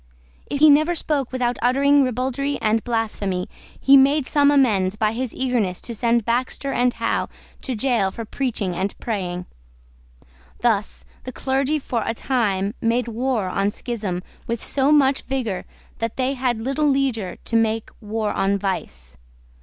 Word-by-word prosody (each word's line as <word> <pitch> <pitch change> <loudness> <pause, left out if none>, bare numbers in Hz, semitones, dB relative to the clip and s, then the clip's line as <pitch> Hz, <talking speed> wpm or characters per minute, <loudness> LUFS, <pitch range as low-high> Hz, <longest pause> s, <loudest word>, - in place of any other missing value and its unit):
If 285 - -3
he 310 - +8
never 310 +4 +4
spoke 290 -5 -1
without 245 -1 -1
uttering 280 +3 +4
ribaldry 260 +3 -1
and 220 0 +1
blasphemy, 210 -6 -2 0.3
he 275 - +6
made 275 +1 +5
some 285 0 +3
amends 210 -10 +3
by 215 0 +1
his 245 +1 -3
eagerness 235 -8 -1
to 235 - -5
send 235 0 +1
Baxter 255 +3 -1
and 245 0 +2
Howe 230 - -1 0.3
to 260 - -3
gaol 230 -4 +1
for 225 +4 -7
preaching 215 -7 -2
and 190 +3 -3
praying. 180 -5 -3 1.2
Thus 220 -4 0 0.2
the 255 - -6
clergy, 270 +3 0
for 250 -5 -2
a 225 - -2
time, 205 -6 0
made 235 +2 +1
war 235 -3 -1
on 195 +2 0
schism 205 -6 -4 0.2
with 230 -1 -3
so 275 +1 +1
much 275 -2 +4
vigour 245 -8 -3 0.3
that 230 -1 -3
they 260 +1 +1
had 250 -3 0
little 270 +6 0
leisure 265 -9 0
to 230 - -3
make 225 -1 +1
war 215 0 -2
on 195 +1 +1
vice. 65 - -4
235 Hz, 155 wpm, -22 LUFS, 210-270 Hz, 1.2 s, he